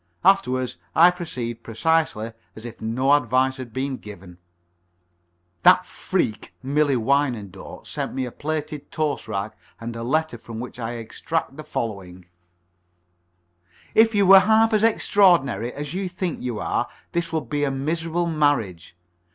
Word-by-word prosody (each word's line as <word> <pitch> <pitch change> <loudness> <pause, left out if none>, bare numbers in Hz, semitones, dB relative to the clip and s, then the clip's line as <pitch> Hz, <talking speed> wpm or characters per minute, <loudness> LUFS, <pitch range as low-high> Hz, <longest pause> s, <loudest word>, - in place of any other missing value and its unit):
Afterwards, 130 -11 +2 0.2
I 170 +2 +7
proceed 125 -10 -5
precisely 115 -2 0 0.2
as 110 - -10
if 120 -1 -9
no 125 +5 +2
advice 130 0 +2
had 130 -3 -8
been 130 +2 -3
given." 95 -5 -12 1.2
That - - +6
freak, 110 - -3
Millie 145 +1 +2
Wyandotte, 120 -6 -1
sent - - -4
me 130 -1 -1
a 125 - -6
plated 150 0 -4
toast 155 -5 -2
rack 105 0 -3 0.2
and 115 0 -6
a 115 - -5
letter 155 +1 -1
from 115 0 -8
which 125 +1 -7
I 115 0 -3
extract 135 +6 -3
the 155 - -8
following: 100 -10 -5 1.7
"If 225 0 +5
you 200 -1 +4
were 195 +1 +10
half 220 +3 +4
as 215 - +3
extraordinary 175 - +3
as 145 +2 -6
you 190 0 -2
think 180 -2 -4
you 125 -3 -3
are, - - -1 0.2
this 170 -1 -1
would 160 -6 -2
be 145 +3 -1
a 145 - +2
miserable 165 +5 -1
marriage. 145 - 0
135 Hz, 145 wpm, -23 LUFS, 115-160 Hz, 1.7 s, were